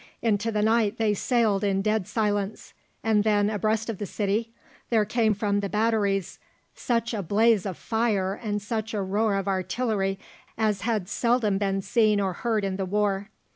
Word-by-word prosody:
Into 225 0 +1
the 210 -1 0
night 220 -1 +2
they 220 -2 +2
sailed 215 -2 +1
in 195 -1 +1
dead 215 -3 0
silence, 210 -1 -2 0.3
and 215 -2 +3
then, 210 -1 +2
abreast 215 +2 0
of 225 -5 -4
the 205 - -3
city, 210 +3 -1 0.4
there 220 -3 +3
came 220 0 +1
from 205 0 0
the 200 -1 -3
batteries 210 -3 0 0.3
such 230 -1 -1
a 215 - -1
blaze 210 +2 +3
of 185 - -5
fire 215 -4 0
and 210 -1 -3
such 220 +1 -3
a 205 - 0
roar 205 +2 +1
of 195 0 -2
artillery 195 +1 -1 0.4
as 215 -3 0
had 220 -6 -1
seldom 225 -2 +1
been 195 -1 -1
seen 215 -2 +3
or 190 -2 0
heard 220 +1 -1
in 190 -1 -2
the 195 - -2
war. 200 0 0
210 Hz, 175 wpm, -26 LUFS, 200-225 Hz, 0.4 s, and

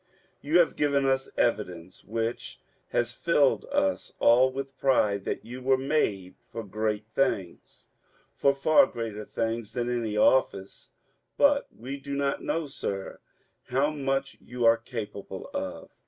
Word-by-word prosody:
You 155 +4 +2
have 170 -3 +4
given 140 -2 +2
us 135 0 +1
evidence 90 -6 -1
which 115 +2 -4 0.3
has 120 0 0
filled 145 -2 +2
us 285 0 -1
all 125 +3 +5
with 135 0 -6
pride 105 -7 +2
that - - -3
you 125 +2 -8
were 130 +1 +3
made 120 -10 0
for 115 0 -8
great 105 +1 -2
things, 100 -10 -2 0.5
for 140 - +3
far 155 +6 +5
greater 110 - -5
things 115 -1 -3
than 120 0 -1
any 115 -3 -2
office, 100 -5 +1 0.5
but 285 0 +4
we 130 +4 -7
do 140 0 -6
not 140 0 -1
know, 165 -1 -1
sir, 100 -8 -5 0.5
how 135 +4 +1
much 135 -2 -2
you 120 -1 -3
are 115 0 +7
capable 115 -4 -7
of. - - -5
125 Hz, 140 wpm, -27 LUFS, 110-140 Hz, 0.5 s, are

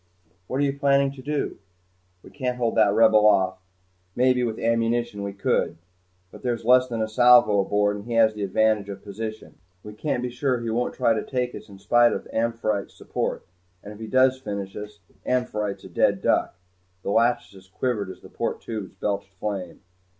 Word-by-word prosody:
"What 130 - -3
are - - +3
you 140 0 -1
planning 140 -1 +3
to 135 -1 -11
do?" 145 +2 -1
I - - -6
asked. 90 -1 -34
"We - - -13
can't 125 -3 -3
hold 120 -2 0
that 105 -2 +4
Rebel 110 0 +5
off. 95 -3 +3 0.6
Maybe 125 0 +3
with 115 -2 -2
ammunition 115 -1 0
we 100 0 -3
could, 95 -4 0 0.5
but - - -13
there's 120 -2 -2
less 125 +1 +5
than 115 -3 -2
a - - -2
salvo 120 -2 +5
aboard 105 +1 +1
and 100 - -10
he 120 - -5
has 110 -1 +4
the 105 - -7
advantage 105 +1 +1
of 100 -1 -8
position. 110 +2 -7 0.2
We 105 - -9
can't 125 +2 -2
be 125 - -3
sure 125 0 0
he 115 -1 -3
won't 120 +2 -1
try 115 - +3
to 110 - -1
take 125 -2 -2
us - - -10
in 100 - -12
spite 120 +5 +4
of - - -5
'Amphitrite's' 115 -3 -1
support - - -3 0.4
and 105 - -9
if 105 - -14
he 110 - -6
does 130 +2 +3
finish 100 -6 -5
us, 105 -1 -9 0.2
'Amphitrite's' 105 -5 -2
a - - -10
dead - - +1
duck." - - +1 0.5
The - - -2
"Lachesis" 105 -4 0
quivered 105 0 -2
as - - -10
the - - -13
port - - -3
turrets 105 -5 -6
belched 100 -1 -3
flame. 95 -3 -5
110 Hz, 200 wpm, -24 LUFS, 100-125 Hz, 0.6 s, Rebel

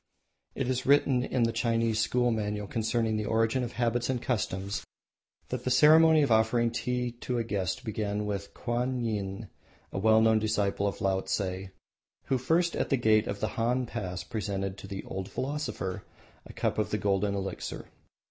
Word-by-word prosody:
It - - -1
is 130 0 -1
written 135 -3 +4
in 125 -1 0
the 115 - +2
Chinese 115 -1 +1
school 120 +2 +2
manual 105 -2 -2
concerning 110 +1 0
the 110 - -2
origin 115 +3 +2
of 120 - -5
habits 120 0 0
and 130 -2 0
customs 100 -5 -2 0.7
that 125 -1 -3
the 130 - -1
ceremony 155 +4 +6
of 135 - 0
offering 115 +1 +3
tea 125 +1 -1
to 125 - -2
a 115 - 0
guest 105 +2 -2
began 105 -2 -2
with 100 -1 -4
Kwanyin, 115 -5 -2 0.4
a - - -3
well 110 +2 +5
known 110 0 +4
disciple 100 -2 0
of 100 - -4
Laotse, 95 0 -1 0.6
who 130 - 0
first 165 +7 +1
at - - -1
the 135 - +3
gate 110 -3 +3
of 100 0 -4
the - - 0
Han 125 +2 0
Pass 90 -7 -5
presented 100 -4 -3
to 100 - -9
the 95 0 -6
"Old 95 0 -5
Philosopher" 130 -7 -3 0.4
a - - -11
cup - - -1
of - - 0
the - - 0
golden 100 0 +1
elixir. 95 -1 -4
110 Hz, 175 wpm, -29 LUFS, 100-125 Hz, 0.7 s, ceremony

